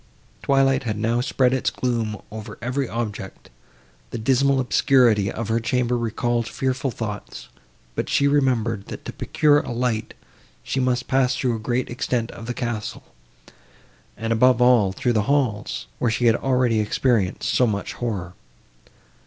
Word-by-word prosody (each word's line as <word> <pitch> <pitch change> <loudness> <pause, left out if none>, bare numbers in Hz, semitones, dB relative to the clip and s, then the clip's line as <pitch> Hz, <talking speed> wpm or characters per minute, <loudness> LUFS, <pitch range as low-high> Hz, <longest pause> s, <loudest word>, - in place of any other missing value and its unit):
Twilight 135 -1 +3
had 110 -5 -3
now 115 +3 +1
spread 125 0 +2
its 130 - +1
gloom 115 -4 -2
over 110 0 -8
every 130 +3 -2
object; 105 -4 -5 0.6
the - - -5
dismal 135 +4 +2
obscurity 120 -5 +3
of 115 -1 -4
her 115 +1 +2
chamber 125 +1 0
recalled 120 0 -1
fearful 130 0 -1
thoughts, 110 -4 -6 0.4
but - - -3
she 140 - +3
remembered, 120 -7 +1
that - - -8
to - - -6
procure 145 -1 +3
a - - -6
light 120 -2 -2 0.5
she 135 - -2
must 125 -1 0
pass 130 -2 +2
through 125 -3 0
a - - -5
great 120 +3 -1
extent 120 -1 -2
of 115 - -10
the 120 - -3
castle, 115 -3 -4 1.1
and, 115 0 -1
above 125 +1 +4
all, 125 -6 +5
through 120 +5 0
the 110 - +2
halls, 130 -8 0
where 120 - +1
she 115 +2 0
had 115 -1 +5
already 125 -4 +1
experienced 105 -2 0
so 125 - +4
much 100 -2 -3
horror. 100 -7 -4
120 Hz, 155 wpm, -23 LUFS, 110-130 Hz, 1.1 s, all